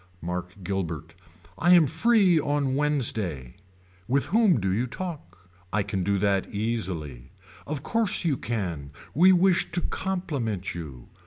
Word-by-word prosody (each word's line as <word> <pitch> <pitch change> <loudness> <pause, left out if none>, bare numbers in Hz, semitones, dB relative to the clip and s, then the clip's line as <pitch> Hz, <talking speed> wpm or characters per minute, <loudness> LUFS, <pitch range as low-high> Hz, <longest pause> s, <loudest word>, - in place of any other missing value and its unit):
Mark 90 +1 -5
Guilbert. 85 -4 -3 0.5
I 175 +2 +6
am 170 -3 +6
free 185 - +3
on 145 -2 0
Wednesday. 110 - -1 0.5
With 135 +3 +1
whom 210 - +3
do 95 -1 -1
you 120 +6 0
talk. 115 - -8 0.2
I 105 0 +1
can 100 -1 -3
do 100 +2 +1
that 100 -1 +1
easily. 95 - -3 0.3
Of 145 -1 -3
course 220 -2 +1
you 155 -4 +2
can 90 - -4 0.2
we 180 +6 +6
wish 185 0 +3
to 175 - 0
compliment 145 - -3
you. 70 -8 -9
115 Hz, 140 wpm, -26 LUFS, -, 0.5 s, I